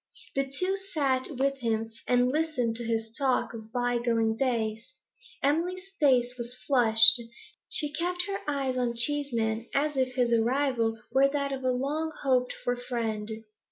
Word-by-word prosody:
The 275 Hz, 0 st, -2 dB
two 370 Hz, +7 st, -1 dB, 0.2 s
sat 265 Hz, -4 st, +1 dB
with 275 Hz, +1 st, 0 dB
him, 225 Hz, -2 st, -2 dB, 0.2 s
and 245 Hz, 0 st, +3 dB
listened 290 Hz, -7 st, -1 dB
to 240 Hz, -, -4 dB
his 225 Hz, -1 st, -2 dB
talk 260 Hz, -1 st, 0 dB
of 220 Hz, -1 st, -10 dB
bygone 240 Hz, -2 st, 0 dB
days. 230 Hz, 0 st, -2 dB, 0.5 s
Emily's 360 Hz, +7 st, -1 dB
face 250 Hz, -5 st, +3 dB
was 240 Hz, +1 st, -5 dB
flushed; 235 Hz, -3 st, +7 dB, 0.5 s
she 295 Hz, -2 st, -1 dB
kept 355 Hz, +2 st, -1 dB
her 395 Hz, -1 st, -3 dB
eyes 275 Hz, -3 st, -1 dB
on 240 Hz, -1 st, -1 dB
Cheeseman 235 Hz, -4 st, +1 dB
as 295 Hz, +1 st, +1 dB
if 255 Hz, -1 st, -1 dB
his 245 Hz, -2 st, +1 dB
arrival 235 Hz, -1 st, +1 dB
were 270 Hz, +1 st, +4 dB
that 280 Hz, -1 st, -2 dB
of 265 Hz, -1 st, -5 dB
a 255 Hz, -, +1 dB
long 290 Hz, +6 st, -1 dB
hoped 255 Hz, -2 st, +2 dB
for 245 Hz, -, 0 dB
friend. 230 Hz, -3 st, -3 dB
255 Hz, 155 wpm, -28 LUFS, 235-280 Hz, 0.5 s, flushed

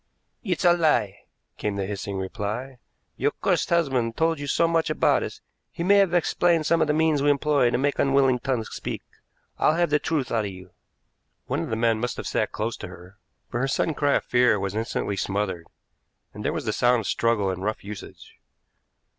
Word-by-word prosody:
"It's 185 Hz, -4 st, -1 dB
a 175 Hz, -, +7 dB
lie," 135 Hz, -, +2 dB, 0.4 s
came 105 Hz, -1 st, -2 dB
the 100 Hz, -1 st, -2 dB
hissing 100 Hz, 0 st, -4 dB
reply. 105 Hz, +7 st, -4 dB, 0.4 s
"Your -, -, +2 dB
cursed -, -, +1 dB
husband 135 Hz, -9 st, +1 dB
told 165 Hz, -1 st, +1 dB
you 145 Hz, -, -5 dB
so 165 Hz, +4 st, +2 dB
much 165 Hz, -1 st, +1 dB
about 155 Hz, -, +2 dB
us, -, -, -6 dB, 0.3 s
he 170 Hz, -, -5 dB
may 200 Hz, +3 st, +5 dB
have 195 Hz, -3 st, +3 dB
explained 170 Hz, -2 st, +2 dB
some 165 Hz, +2 st, +2 dB
of 155 Hz, -, +3 dB
the -, -, +2 dB
means 155 Hz, -2 st, +2 dB
we 145 Hz, -, +3 dB
employ 145 Hz, -3 st, +3 dB
to 120 Hz, -, 0 dB
make 140 Hz, +2 st, 0 dB
unwilling 135 Hz, -2 st, +3 dB
tongues 120 Hz, -3 st, -2 dB
speak. -, -, -5 dB, 0.6 s
I'll 155 Hz, -, +3 dB
have 170 Hz, -2 st, +1 dB
the 150 Hz, -, +4 dB
truth 145 Hz, -7 st, -2 dB
out 110 Hz, -2 st, +1 dB
of -, -, -3 dB
you." 95 Hz, -1 st, -12 dB, 0.7 s
One -, -, -2 dB
of -, -, -4 dB
the 110 Hz, -, -1 dB
men 115 Hz, -1 st, +1 dB
must 120 Hz, +1 st, -3 dB
have -, -, -5 dB
sat 110 Hz, -, -1 dB
close 110 Hz, +2 st, -3 dB
to -, -, -7 dB
her, 90 Hz, +2 st, -14 dB, 0.3 s
for 120 Hz, -, -2 dB
her 135 Hz, -, +1 dB
sudden 155 Hz, +3 st, 0 dB
cry 145 Hz, -1 st, +1 dB
of -, -, +1 dB
fear 120 Hz, -4 st, +3 dB
was 95 Hz, 0 st, -3 dB
instantly 110 Hz, -2 st, -2 dB
smothered, 95 Hz, -4 st, -2 dB, 0.7 s
and -, -, -8 dB
there -, -, 0 dB
was -, -, -4 dB
the -, -, 0 dB
sound 125 Hz, -1 st, +3 dB
of -, -, -9 dB
struggle 105 Hz, -2 st, +1 dB
and 95 Hz, 0 st, -5 dB
rough 110 Hz, +1 st, -2 dB
usage. 100 Hz, -1 st, -10 dB
125 Hz, 210 wpm, -25 LUFS, 105-155 Hz, 0.7 s, a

